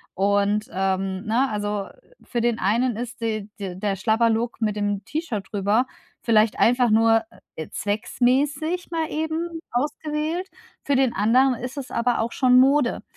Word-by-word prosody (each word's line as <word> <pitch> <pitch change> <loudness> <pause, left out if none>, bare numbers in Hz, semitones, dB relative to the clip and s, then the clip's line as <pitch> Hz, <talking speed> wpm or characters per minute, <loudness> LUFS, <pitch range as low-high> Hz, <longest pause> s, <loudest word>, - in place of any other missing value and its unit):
und, 200 +2 +1
ähm, 190 +1 -1
ne? 240 +5 +2
Also, 205 -1 -2
äh, - - -20
für 240 - -3
den 235 -1 +1
einen 235 +5 +1
ist 240 +1 -6
de 215 -3 -2
de 190 -3 -5
der 195 +1 -1
Schlabberlook 225 +4 +1
mit 215 -2 0
dem 205 -1 -2
T-Shirt 285 - -4
drüber 205 +4 +1 0.4
vielleicht 220 -2 +3
einfach 245 +1 +3
nur, 225 +1 +4 0.4
äh, 160 - -5
zwecksmäßig 280 - -1
mal 325 -2 -1
eben 320 +2 -3
ausgewählt, 300 +6 -2 0.4
für 280 - +1
den 260 -2 +3
anderen 250 +6 +3
ist 250 +2 -6
es 275 -3 -7
aber 240 +1 0
auch 230 +1 -1
schon 250 0 +4
Mode. 280 +2 +2
235 Hz, 155 wpm, -23 LUFS, 205-270 Hz, 0.4 s, nur